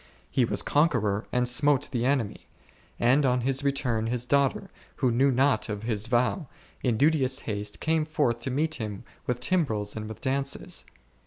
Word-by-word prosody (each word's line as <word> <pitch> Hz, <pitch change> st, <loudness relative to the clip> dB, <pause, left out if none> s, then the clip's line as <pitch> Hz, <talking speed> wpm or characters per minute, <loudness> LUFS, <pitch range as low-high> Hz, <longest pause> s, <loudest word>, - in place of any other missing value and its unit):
He 130 Hz, -, +2 dB
was -, -, -1 dB
conqueror 115 Hz, -9 st, +1 dB
and 125 Hz, 0 st, +1 dB
smote 145 Hz, +2 st, +3 dB
the 120 Hz, -2 st, 0 dB
enemy, 130 Hz, -7 st, -1 dB, 0.5 s
and 130 Hz, +5 st, +4 dB
on 125 Hz, -2 st, +2 dB
his 135 Hz, +2 st, +1 dB
return 125 Hz, -5 st, 0 dB
his 120 Hz, +1 st, -1 dB
daughter, 140 Hz, +1 st, +1 dB, 0.2 s
who 125 Hz, -, +1 dB
knew 130 Hz, +4 st, +3 dB
not 130 Hz, -3 st, +2 dB
of 105 Hz, 0 st, -4 dB
his 110 Hz, -2 st, -2 dB
vow, 125 Hz, +6 st, +1 dB, 0.3 s
in 120 Hz, -4 st, 0 dB
duteous 135 Hz, -2 st, +2 dB
haste 105 Hz, -1 st, -4 dB
came 160 Hz, -1 st, +1 dB
forth 145 Hz, -7 st, 0 dB
to 130 Hz, -, -3 dB
meet 155 Hz, +5 st, 0 dB
him 105 Hz, -3 st, -5 dB, 0.2 s
with 125 Hz, -1 st, -1 dB
timbrels 125 Hz, -, 0 dB
and 110 Hz, -1 st, -5 dB
with 110 Hz, -, -8 dB
dances. 135 Hz, +1 st, -1 dB
125 Hz, 170 wpm, -27 LUFS, 115-140 Hz, 0.5 s, and